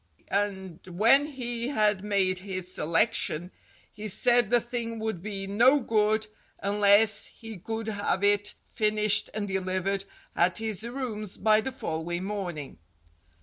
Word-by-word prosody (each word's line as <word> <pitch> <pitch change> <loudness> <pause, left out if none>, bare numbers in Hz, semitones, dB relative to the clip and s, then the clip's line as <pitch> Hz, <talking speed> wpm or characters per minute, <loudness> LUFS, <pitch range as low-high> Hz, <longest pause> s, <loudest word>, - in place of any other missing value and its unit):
And 190 -4 -2
when 230 +11 +4
he 240 -4 -4
had 210 -7 +1
made 195 -3 +1
his 185 -1 -5
selection, 170 0 0 0.4
he 215 +1 -7
said 240 +2 +3
the 240 - +4
thing 235 -1 -4
would 220 -5 -3
be 200 0 -4
no 240 +9 +4
good 215 -2 +1 0.3
unless 205 +1 +4
he 225 -4 -10
could 225 +4 -4
have 205 -2 -1
it 205 0 +3
finished 215 -1 +1
and 210 -1 -3
delivered 190 0 -1 0.3
at 175 +1 +2
his 220 -3 -2
rooms 235 -5 -4
by 215 0 +4
the 265 - -4
following 175 - -4
morning. 175 - -5
210 Hz, 135 wpm, -27 LUFS, 190-225 Hz, 0.4 s, when